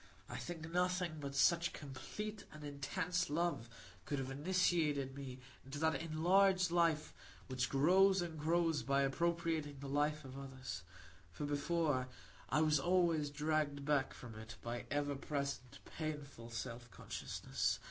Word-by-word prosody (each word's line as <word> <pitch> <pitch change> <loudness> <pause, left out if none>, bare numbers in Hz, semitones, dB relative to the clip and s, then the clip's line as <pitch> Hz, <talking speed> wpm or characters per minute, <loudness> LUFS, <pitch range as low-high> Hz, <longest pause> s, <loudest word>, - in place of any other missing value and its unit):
I - - -5
think 165 -2 -5
nothing 180 -2 +1
but 140 -1 -5
such 170 +4 +4
complete 200 +10 -6
and 155 0 -10
intense 160 +6 -1
love 155 -7 0 0.4
could 145 - -1
have 135 0 -3
initiated 150 -3 +2
me 135 -2 -6 0.3
into 135 +2 -7
that 160 +1 +3
enlarged 185 +3 +4
life 165 -3 +2 0.3
which 125 -2 -1
grows 190 +7 +5
and 165 -3 -3
grows 165 0 +2
by 140 0 +2
appropriating 160 0 0
the 140 - -6
life 150 +1 +1
of 130 +1 -7
others; 130 -3 -6 0.5
for 90 +12 -4
before, 145 -2 +1 0.4
I 155 - +3
was 155 -2 +4
always 170 -2 +3
dragged 150 -1 0
back 145 -2 +2
from 120 -2 -9
it 110 +1 -8
by 120 0 -3
ever 145 0 0
present 140 -2 -3
painful 145 -7 -5
self 115 +1 -5
consciousness. - - -2
150 Hz, 140 wpm, -38 LUFS, 135-170 Hz, 0.5 s, grows